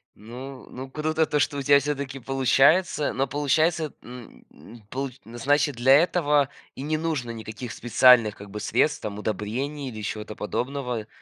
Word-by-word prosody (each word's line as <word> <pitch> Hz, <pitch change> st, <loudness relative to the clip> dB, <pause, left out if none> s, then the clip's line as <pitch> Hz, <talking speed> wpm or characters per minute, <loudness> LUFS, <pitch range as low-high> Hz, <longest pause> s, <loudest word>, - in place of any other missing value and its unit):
Ну 125 Hz, +5 st, -10 dB
ну 130 Hz, +1 st, -8 dB
круто 155 Hz, +3 st, 0 dB
то, 150 Hz, -, 0 dB
что 145 Hz, 0 st, 0 dB
у -, -, -2 dB
тя 140 Hz, +1 st, +5 dB
всё-таки 140 Hz, -1 st, -4 dB
получается, 135 Hz, +5 st, +2 dB
но 135 Hz, +1 st, 0 dB
получается, 155 Hz, +3 st, +1 dB
н 125 Hz, 0 st, -12 dB
н 115 Hz, +2 st, -15 dB
получ 135 Hz, +1 st, -4 dB
значит, 140 Hz, +5 st, 0 dB
для 125 Hz, +3 st, +5 dB
этого 150 Hz, -3 st, +3 dB, 0.3 s
и -, -, -7 dB
не 155 Hz, +2 st, -1 dB
нужно 155 Hz, -6 st, -2 dB
никаких 115 Hz, +1 st, -7 dB
специальных 120 Hz, -2 st, +5 dB
как 100 Hz, 0 st, -12 dB
бы 105 Hz, +2 st, -6 dB
средств, 150 Hz, +8 st, +1 dB
там 105 Hz, -1 st, -5 dB
удобрений 125 Hz, +8 st, -3 dB
или 110 Hz, -3 st, -8 dB
чего-то 105 Hz, 0 st, -5 dB
подобного. 125 Hz, 0 st, -3 dB
135 Hz, 160 wpm, -25 LUFS, 115-145 Hz, 0.3 s, тя